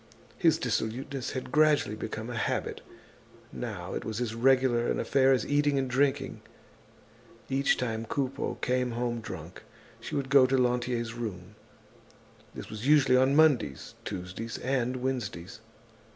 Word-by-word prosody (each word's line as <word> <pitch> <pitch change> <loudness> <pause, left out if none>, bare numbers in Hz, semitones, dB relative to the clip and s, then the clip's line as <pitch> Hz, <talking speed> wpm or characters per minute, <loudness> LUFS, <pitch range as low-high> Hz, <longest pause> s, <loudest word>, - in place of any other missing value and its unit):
His - - +4
dissoluteness 130 +4 -2
had 130 -1 -5
gradually 150 -8 +3
become 110 +2 -5
a - - -5
habit. 115 - -2 0.7
Now - - -5
it - - -3
was 110 0 -4
as 120 -3 -2
regular 125 0 +3
an - - 0
affair 135 -1 +3
as 125 -5 +2
eating 145 0 +2
and 135 -1 0
drinking. 135 +1 0 1.1
Each 135 +1 +2
time 115 -2 -2
Coupeau 135 0 -2
came 125 -1 0
home 120 0 -2
drunk, - - -8 0.4
she - - -6
would 135 -1 -2
go 135 -2 +7
to 135 +1 +2
Lantier's 120 -2 0
room. 105 -5 -6 1.0
This - - -7
was 110 +4 -5
usually 140 -4 +5
on 130 +2 +4
Mondays, 145 - +3
Tuesdays 95 +4 -5
and 130 -1 -1
Wednesdays. 115 -6 -4
125 Hz, 140 wpm, -29 LUFS, 115-135 Hz, 1.1 s, go